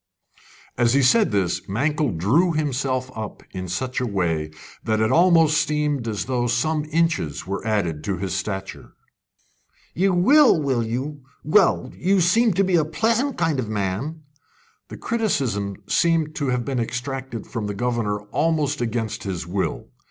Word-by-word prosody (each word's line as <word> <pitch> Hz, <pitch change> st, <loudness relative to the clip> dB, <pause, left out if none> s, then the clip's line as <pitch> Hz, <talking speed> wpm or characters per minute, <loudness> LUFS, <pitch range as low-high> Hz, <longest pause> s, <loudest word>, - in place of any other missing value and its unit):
As 120 Hz, +1 st, +3 dB
he 140 Hz, -, +4 dB
said 215 Hz, -, +4 dB
this 95 Hz, -4 st, -1 dB
Mankell 145 Hz, +7 st, 0 dB
drew 150 Hz, -, +2 dB
himself 135 Hz, -4 st, -1 dB
up 110 Hz, -2 st, -7 dB
in 95 Hz, -1 st, -5 dB
such 125 Hz, +9 st, -3 dB
a 125 Hz, -, -1 dB
way 85 Hz, -7 st, -1 dB, 0.3 s
that 110 Hz, -1 st, 0 dB
it 110 Hz, 0 st, +2 dB
almost 165 Hz, -3 st, +4 dB
seemed 150 Hz, -5 st, -1 dB
as 105 Hz, -2 st, -2 dB
though 125 Hz, -2 st, -1 dB
some 150 Hz, +6 st, 0 dB
inches 155 Hz, -, -1 dB
were 100 Hz, +1 st, -4 dB
added 85 Hz, -8 st, -1 dB
to 100 Hz, -2 st, -1 dB
his 95 Hz, +1 st, -3 dB
stature. 95 Hz, +1 st, -5 dB, 1.0 s
"You 195 Hz, +2 st, +2 dB
will, 260 Hz, -, +5 dB
will 135 Hz, -5 st, 0 dB
you? 130 Hz, +6 st, -4 dB, 0.2 s
Well, 185 Hz, +5 st, +3 dB
you 190 Hz, +2 st, +2 dB
seem 215 Hz, +6 st, +3 dB
to 195 Hz, +3 st, +2 dB
be 185 Hz, -2 st, +2 dB
a 160 Hz, -, +3 dB
pleasant 230 Hz, -, 0 dB
kind 155 Hz, -5 st, 0 dB
of 115 Hz, -4 st, -3 dB
man!" 110 Hz, +10 st, -3 dB, 0.6 s
The -, -, -9 dB
criticism 130 Hz, -, -1 dB
seemed 165 Hz, -2 st, +2 dB
to 145 Hz, -, -1 dB
have 125 Hz, -2 st, -1 dB
been 135 Hz, -3 st, -2 dB
extracted 125 Hz, 0 st, -4 dB
from 110 Hz, -4 st, -4 dB
the 100 Hz, -, -4 dB
governor 115 Hz, -3 st, -1 dB
almost 150 Hz, -3 st, 0 dB
against 115 Hz, -2 st, -2 dB
his 95 Hz, -5 st, -4 dB
will. 95 Hz, +2 st, -3 dB
130 Hz, 160 wpm, -23 LUFS, 105-160 Hz, 1.0 s, will